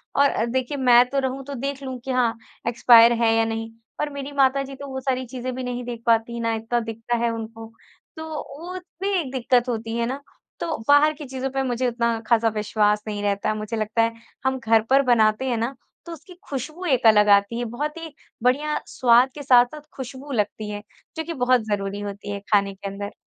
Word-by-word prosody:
और 280 -5 +3
देखिए 260 +3 -2
मैं 245 -2 +6
तो 275 - 0
रहूँ 265 0 -3
तो 285 - -6
देख 275 +2 -4
लूँ 260 -1 -5
कि 265 - -2
हाँ, 240 -3 +1 0.3
एक्सपायर 235 0 +7
है 225 -1 +4
या 225 0 +3
नहीं 225 0 -3 0.3
पर 300 0 -1
मेरी 280 0 -6
माताजी 275 0 +1
तो 280 +1 -8
वो 265 -1 -5
सारी 260 -1 -1
चीज़ें 250 +1 -5
भी 260 - -4
नहीं 245 0 -4
देख 235 -2 -6
पाती 230 +1 +2
ना 230 -1 0
इत्ता 225 +2 -1
दिखता 225 +1 -3
है 235 0 +1
उनको, 225 0 -7 0.5
तो 315 - -5 0.4
वो 355 +2 -7 0.3
भी 395 - 0
एक 265 -6 -4
दिक्कत 250 -1 +1
होती 225 0 -3
है 235 - 0
ना, 265 +3 -3 0.4
तो 330 - -2
बाहर 290 +2 +6
की 295 0 -9
चीज़ों 265 0 -4
पे 270 0 -1
मुझे 250 0 -1
उतना 235 -1 0
खासा 230 -1 +3
विश्वास 210 0 +1
नहीं 205 -1 -3
रहता। 200 +1 0
मुझे 215 +1 -4
लगता 215 +1 0
है 230 0 +1 0.3
हम 265 0 +1
घर 225 -1 +3
पर 275 +1 +5
बनाते 220 +1 +3
हैं 235 - 0
ना 235 +4 -2 0.3
तो 340 - -8
उसकी 330 +4 -13 0.2
खुशबू 305 +7 -5
एक 260 -6 +1
अलग 210 -1 +6
आती 200 +4 -3
है 240 - -2
बहुत 300 +2 -3
ही 325 -2 -8 0.3
बढ़िया 295 +5 +1
स्वाद 250 +1 +4
के 290 - -7
साथ-साथ 250 +3 +4
खुशबू 265 +2 -8
लगती 210 -2 -2
है, 205 0 -6 0.3
जो 320 - -1
कि 335 +1 -5
बहुत 250 -2 +2
ज़रूरी 200 0 -2
होती 205 0 -6
है 200 - -4
खाने 200 -1 +3
के 200 +1 -7
अंदर। 200 +1 -6
245 Hz, 215 wpm, -23 LUFS, 225-270 Hz, 0.5 s, एक्सपायर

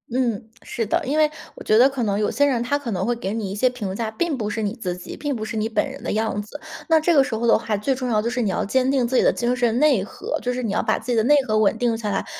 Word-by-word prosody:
嗯， 230 -4 -1
是 230 - -3
的， 205 - 0
因 275 +3 -1
为 305 -1 +4 0.3
我 - - -10
觉 215 - +3
得 250 +3 +7
可 270 -3 -3
能 205 -2 0
有 210 - +1
些 285 - +1
人 260 -5 +1
他 285 +4 0
可 285 -4 -6
能 190 -1 -1
会 240 - 0
给 205 -4 -4
你 215 -4 -3
一 - - -4
些 255 +5 +3
评 210 -7 -5
价， 225 +1 -2
并 310 +7 -1
不 210 -3 -2
是 220 +1 -3
你 205 - -1
自 180 -7 -4
己， 180 - -8
并 290 -1 -3
不 215 -2 -4
是 220 - -5
你 220 0 -1
本 230 - 0
人 275 +1 -10
的 - - -2
样 220 -1 -1
子。 215 +8 -10 0.3
那 320 -1 +5
这 335 +2 +2
个 275 - +6
时 255 - -5
候 230 +2 -2
的 - - +6
话， 215 -2 -2
最 240 +7 0
重 255 -1 -3
要 215 -2 +2
就 230 - -1
是 250 0 -1
你 215 - 0
要 185 - -1
坚 255 +5 +1
定 260 -3 +1
自 260 - -2
己 - - +5
的 - - +4
精 245 +1 -1
神 240 -2 +1
内 280 -9 +4
核， 205 - -5
就 250 - -1
是 250 0 -3
你 220 - -1
要 - - +1
把 - - +1
自 235 +3 -5
己 - - +2
的 220 - +3
内 290 +6 +5
核 215 -4 0
稳 215 - +2
定 240 -2 +1
下 220 -2 -3
来， 195 - -1
235 Hz, 365 characters per minute, -22 LUFS, 215-260 Hz, 0.3 s, 得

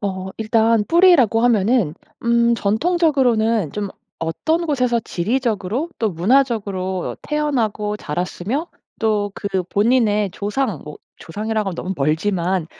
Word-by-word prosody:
어 190 -2 -4
일단 225 0 +2
뿌리라고 330 - +5
하면은 220 -6 +2 0.3
음 235 0 +3
전통적으로는 230 - +1
좀 205 -1 -3 0.3
어떤 315 - -1
곳에서 250 -5 +1
지리적으로 230 - -2
또 220 -2 0
문화적으로 195 -2 0
태어나고 230 -9 -1
자랐으며 185 - -3 0.3
또 210 -2 +1
그 190 -2 -2
본인의 210 0 +2
조상 210 - -2
뭐 150 - -9 0.2
조상이라고 210 +2 -3
너무 185 +2 -4
멀지만 170 +4 0
215 Hz, 280 characters per minute, -20 LUFS, 190-245 Hz, 0.3 s, 뿌리라고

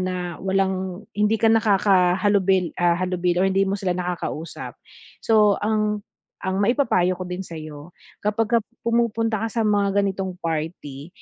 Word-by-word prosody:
na 180 -2 -3
walang 190 0 -1
hindi 210 +2 +2
ka 225 - +4
nakakahalubil 195 -3 +3
ah, 175 -1 +3
halubilo 180 -1 0
or - - +3
hindi 195 +1 +2
mo 195 - 0
sila 180 -2 0
nakakausap. 175 -2 -5 0.5
So 210 -2 +4
ang 210 -1 0 0.4
ang 190 0 -1
maipapayo 200 -7 +2
ko 185 - -4
din 180 +1 -4
sa'yo 155 0 -9 0.3
kapagka 225 +2 +1 0.3
pumupunta 230 -1 +1
ka - - -3
sa 230 - 0
mga 200 -1 +2
ganitong 190 -2 -3
party 155 -3 -4
190 Hz, 140 wpm, -23 LUFS, 180-210 Hz, 0.5 s, ka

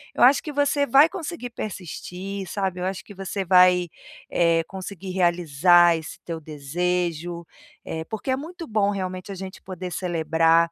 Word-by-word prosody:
eu - - +3
acho 265 +3 +7
que 305 - -6
você 285 0 +1
vai 275 +5 +7
conseguir 330 -7 -6
persistir, 190 -1 -6
sabe, 190 -2 -2
eu 180 - -2
acho 190 0 -4
que 205 - -11
você 195 0 -4
vai, 180 -1 +5 0.4
eh, 165 -1 +3
conseguir 190 0 -7
realizar 175 -1 +4
esse 160 -1 -7
teu 165 -1 -5
desejo, 170 +3 -2 0.4
eh, 160 0 -4
porque 220 +8 -4
é - - +3
muito 335 +5 -7
bom 210 -3 +2
realmente 185 -1 -4
a - - -5
gente 190 +1 -8
poder 185 -1 -7
celebrar, 165 -1 +2
185 Hz, 160 wpm, -24 LUFS, 170-200 Hz, 0.4 s, acho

